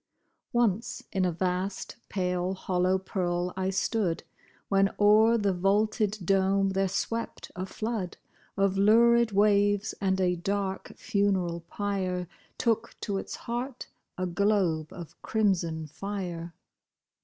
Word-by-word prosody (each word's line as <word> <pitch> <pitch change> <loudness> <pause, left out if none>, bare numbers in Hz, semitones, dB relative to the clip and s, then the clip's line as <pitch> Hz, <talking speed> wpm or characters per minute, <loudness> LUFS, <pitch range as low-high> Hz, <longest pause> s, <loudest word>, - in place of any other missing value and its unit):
Once 230 -3 0
in 190 -1 +1
a 180 - +1
vast, 185 +3 -2
pale, 180 -1 -1
hollow 185 0 +1
pearl 180 -2 -2
I 190 0 -1
stood, 195 -2 0 0.4
When 195 0 +3
o'er 215 +3 +6
the 205 -3 +1
vaulted 210 +3 +1
dome 195 +1 +3
there 195 0 +1
swept 230 +5 -3
a 185 +1 -4
flood 215 -4 -3 0.4
Of 195 -1 +2
lurid 235 +2 +5
waves, 205 0 +3
and 190 -1 +1
a 180 -1 +2
dark 195 +2 -3
funeral 190 -4 0
pyre 185 -3 -2 0.3
Took 230 -1 0
to 200 -3 -1
its - - -6
heart 245 +2 -5 0.3
a 185 - -1
globe 180 -4 +1
of 170 -3 -10
crimson 175 -7 0
fire. 175 -1 -5
195 Hz, 120 wpm, -28 LUFS, 180-205 Hz, 0.4 s, o'er